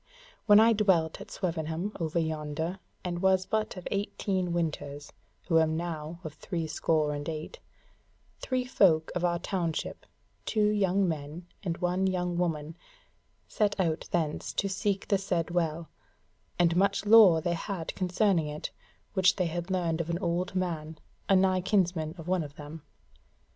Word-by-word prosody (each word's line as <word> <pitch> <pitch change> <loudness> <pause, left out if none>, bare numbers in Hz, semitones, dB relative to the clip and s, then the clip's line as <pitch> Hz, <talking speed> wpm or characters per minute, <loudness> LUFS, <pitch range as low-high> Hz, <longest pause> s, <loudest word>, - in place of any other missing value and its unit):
When 205 0 +8
I 225 +1 +6
dwelt 190 -5 +2
at 200 - -10
Swevenham 165 +1 -3
over 165 0 -2
yonder, 160 +2 -2 0.2
and 175 -1 -3
was 190 -1 +3
but 215 -1 -1
of 180 - -6
eighteen 195 -2 -1
winters, 145 -4 -3 0.3
who 165 -2 +4
am 160 0 +2
now 165 -1 -5
of 155 -3 -6
three 165 +1 -4
score 155 -1 +1
and 145 +2 -4
eight, 155 -1 -6 0.8
three 255 -1 -1
folk 175 -11 +3
of 180 - -2
our 175 -1 +2
township, 170 -3 -3 0.4
two 210 -2 +2
young 195 -2 +2
men 155 +1 -4 0.2
and 170 -4 -3
one 180 +1 +1
young 180 -2 -1
woman, 160 -3 -2 0.7
set 205 -3 0
out 165 -3 0
thence 160 -4 -1
to 200 - 0
seek 195 0 -1
the 200 - +2
said 175 -3 -1
Well: 165 -1 -1 0.7
and 170 -1 +3
much 195 +2 +2
lore 205 -6 +8
they 170 +2 -1
had 170 0 -4
concerning 185 -3 +1
it, 150 0 -5 0.4
which 190 -1 +4
they 180 - 0
had 175 +2 -3
learned 170 -3 0
of 165 - -6
an 170 - 0
old 180 0 -2
man, 160 -4 -2 0.3
a 195 - +6
nigh 185 -1 +3
kinsman 180 -5 +1
of 165 0 -9
one 185 -1 +1
of 145 -2 -7
them. 150 +2 -9
175 Hz, 160 wpm, -29 LUFS, 160-190 Hz, 0.8 s, When